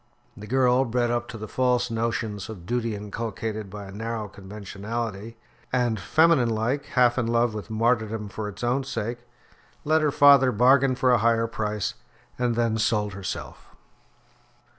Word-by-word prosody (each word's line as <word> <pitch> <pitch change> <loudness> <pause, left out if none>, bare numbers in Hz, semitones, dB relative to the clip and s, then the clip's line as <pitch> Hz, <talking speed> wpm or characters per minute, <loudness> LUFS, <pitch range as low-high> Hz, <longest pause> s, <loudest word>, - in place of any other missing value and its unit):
The 105 0 -10
girl, 130 +1 +3
bred 120 -1 0
up 120 0 -1
to 115 - -8
the 110 0 -7
false 125 0 +1
notions 115 -2 -2
of 95 -6 -9
duty 115 0 -1
inculcated 110 0 -5
by 100 +1 -8
a 95 - -10
narrow 110 +1 -4
conventionality, 105 +2 -6 0.3
and, 120 -4 +1
feminine 155 - +3
like, 115 +6 -1
half 125 -1 +3
in 115 - 0
love 115 0 +2
with 105 +1 -7
martyrdom 110 -1 0
for 105 +1 -5
its 105 - -10
own 125 +3 +1
sake, 120 -2 -4 0.6
let 155 +1 +2
her 150 - +2
father 140 -2 +6
bargain 130 +3 +4
for 130 0 +2
a 120 - +4
higher 115 +1 +2
price, 105 -2 -2 0.5
and 120 -2 +1
then 115 -1 +1
sold 105 -2 0
herself. 100 -1 -7
115 Hz, 160 wpm, -25 LUFS, 105-125 Hz, 0.6 s, father